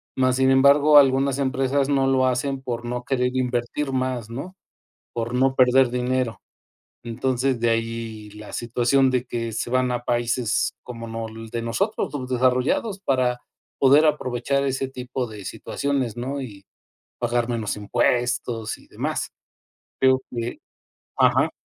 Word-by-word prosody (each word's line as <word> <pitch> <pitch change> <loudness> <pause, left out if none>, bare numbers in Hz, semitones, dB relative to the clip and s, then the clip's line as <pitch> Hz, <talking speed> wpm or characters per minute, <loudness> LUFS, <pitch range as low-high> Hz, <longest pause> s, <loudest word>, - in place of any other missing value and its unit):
más, 130 -1 +2
sin 130 0 +3
embargo, 140 +3 +6
algunas 135 0 +4
empresas 135 0 0
no 135 -2 +2
lo 130 -1 +3
hacen 130 +2 -1
por 120 -2 -4
no 125 +1 -3
querer 125 -1 0
invertir 125 +2 -1
más, 130 -4 -2
¿no? 140 +11 -7 0.6
Por 115 +1 -3
no 130 +1 +3
perder 130 -1 +4
dinero. 125 -1 -1 0.6
Entonces 125 +2 -1
de 120 0 +2
ahí 115 -2 -3
la 105 0 -11
situación 125 +3 +2
de 125 -1 0
que 115 -1 -3
se 110 +2 -3
van 130 0 +1
a 120 0 -2
países 120 -1 0
como 115 -2 -8
nol 115 0 -6
de 115 - -3
nosotros 190 - -1
subdesarrollados 130 - 0
para, 130 -5 +1 0.4
poder 140 +3 +6
aprovechar 140 -1 0
ese 135 0 -1
tipo 125 -1 -4
de 105 -3 -10
situaciones, 120 +3 -2
¿no? 135 +4 -3
Y 100 -7 -9 0.5
pagar 120 0 0
menos 115 -3 -2
impuestos 115 +2 0
y - - -20
demás. - - -3 0.7
Creo 130 0 +4
que, 120 -1 -4 0.6
ajá - - +3
125 Hz, 140 wpm, -23 LUFS, 120-135 Hz, 0.7 s, embargo